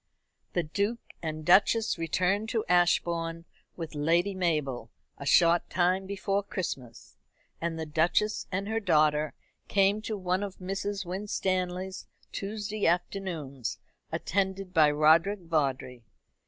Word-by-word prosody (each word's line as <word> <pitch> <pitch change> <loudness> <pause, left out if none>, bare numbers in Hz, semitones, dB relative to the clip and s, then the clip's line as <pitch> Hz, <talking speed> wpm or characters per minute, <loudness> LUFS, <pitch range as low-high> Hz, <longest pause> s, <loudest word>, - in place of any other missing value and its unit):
The 175 - +1
Duke 200 +9 -1 0.2
and 155 -1 -4
Duchess 205 +3 +4
returned 185 +6 0
to 225 -3 -1
Ashbourne 170 -1 +1 0.3
with 165 -2 -6
Lady 170 +6 +2
Mabel 150 -10 -1 0.3
a 140 - -6
short 170 +1 +4
time 185 +2 +1
before 200 0 -1
Christmas, 125 - -6 0.4
and 165 -1 -2
the 160 - -3
Duchess 170 +7 +1
and 195 +2 -2
her 220 +1 0
daughter 155 -5 +2 0.3
came 200 +1 +3
to 215 -1 -4
one 185 0 0
of 200 -2 -5
Mrs. 195 +1 -3
Winstanley's 185 -1 -2 0.2
Tuesday 210 +1 -2
afternoons, 165 - -2 0.3
attended 190 0 -1
by 155 -4 +6
Roderick 160 +7 +4
Vawdrey. 135 -6 -1
180 Hz, 120 wpm, -29 LUFS, 160-195 Hz, 0.4 s, by